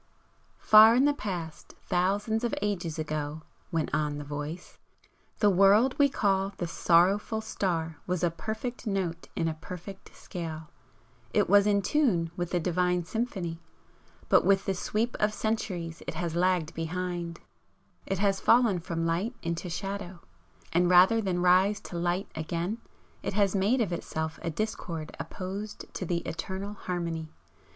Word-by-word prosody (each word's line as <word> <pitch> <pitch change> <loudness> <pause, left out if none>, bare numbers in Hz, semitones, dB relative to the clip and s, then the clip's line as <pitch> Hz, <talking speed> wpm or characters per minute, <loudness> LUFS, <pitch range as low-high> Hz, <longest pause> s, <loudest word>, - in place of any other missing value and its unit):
"Far 220 +2 +8
in 260 +3 +4
the 290 - +4
Past, 175 - -6
thousands 200 +5 0
of 240 - 0
ages 185 -6 -2
ago," 155 0 -3 0.3
went 165 -3 -1
on 150 -1 0
the 145 - -5
Voice 150 +4 -6 0.6
"the 210 - +4
world 200 +7 +5
we 285 0 +6
call 195 -5 +1
the 175 - -2
Sorrowful 180 +6 +3
Star 170 -7 -2
was 180 -1 -1
a 175 - +3
perfect 220 +7 -5
note 180 -4 -2
in 165 - 0
a 160 - 0
perfect 180 +4 -10
scale. 160 -3 -7 0.6
It - - +4
was 205 +2 +5
in 200 -1 +3
tune 185 - +2
with 175 -1 -3
the 175 - 0
Divine 180 +1 +1
Symphony. 190 -7 -3 0.7
But - - +5
with 195 +1 +3
the 195 - +1
sweep 215 +5 -1
of 210 0 +1
centuries 185 -7 -2
it - - -4
has 170 0 -2
lagged 175 -2 +1
behind; 170 0 -3 0.7
it 195 - -1
has 195 0 +2
fallen 230 -6 +4
from 165 -1 -3
Light 180 +9 -1
into 170 +2 -3
Shadow. 190 0 -5 0.5
And 175 +1 +3
rather 185 +6 +6
than 180 -3 -1
rise 190 +3 +4
to - - -9
Light 175 +3 0
again, 170 +7 -3 0.4
it - - -3
has 200 -1 +2
made 210 +7 +2
of 190 -6 0
itself 160 -1 -4
a 170 - -2
discord 165 -3 -4
opposed 200 +3 -6
to 185 - -4
the 170 0 0
eternal 190 +5 -4
Harmony. 170 -5 -4
180 Hz, 155 wpm, -28 LUFS, 165-205 Hz, 0.7 s, Far